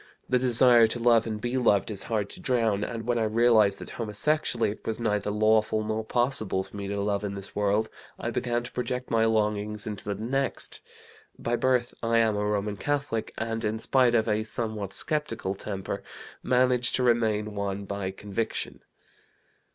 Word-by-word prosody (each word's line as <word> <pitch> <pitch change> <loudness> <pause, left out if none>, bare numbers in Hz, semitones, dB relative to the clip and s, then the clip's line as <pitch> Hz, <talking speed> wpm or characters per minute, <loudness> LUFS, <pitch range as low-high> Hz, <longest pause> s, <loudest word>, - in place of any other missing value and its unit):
The 125 - +2
desire 120 -2 +5
to 110 - -4
love 115 -1 +4
and 110 -1 -3
be 120 +3 -2
loved 110 -4 +2
is 100 - -4
hard 105 -3 0
to - - -10
drown, 115 - +1
and, 115 0 -4
when 120 0 +1
I - - +1
realized 110 -2 +4
that - - -9
homosexually 115 +1 0
it 105 - -10
was 110 0 -3
neither 105 -3 0
lawful 110 +1 +2
nor 110 +1 -2
possible 110 -5 +1
for - - -14
me 100 -1 -4
to 100 0 -2
love 100 0 0
in 100 -1 -3
this 100 0 -8
world, 105 +2 +1 0.3
I - - -3
began 120 -1 -1
to 120 - -8
project 125 0 -3
my 115 -1 +3
longings 105 -1 0
into 105 -2 -5
the - - -2
next. 135 +5 -2 0.6
By 120 - -1
birth 125 -1 +1
I 115 0 +2
am 110 -2 +3
a 105 - -1
Roman 105 0 -1
Catholic, 140 -3 -2
and 115 +1 -2
in 110 +1 0
spite 125 +1 +3
of 110 -1 +2
a 110 0 +1
somewhat 110 -3 -4
skeptical 150 -10 -2
temper, 95 -1 -5 0.4
manage 125 -1 +2
to 130 - +1
remain 110 -3 +2
one 100 -1 -3
by 100 -1 -3
conviction. 105 +3 -3
110 Hz, 180 wpm, -27 LUFS, 105-120 Hz, 0.6 s, desire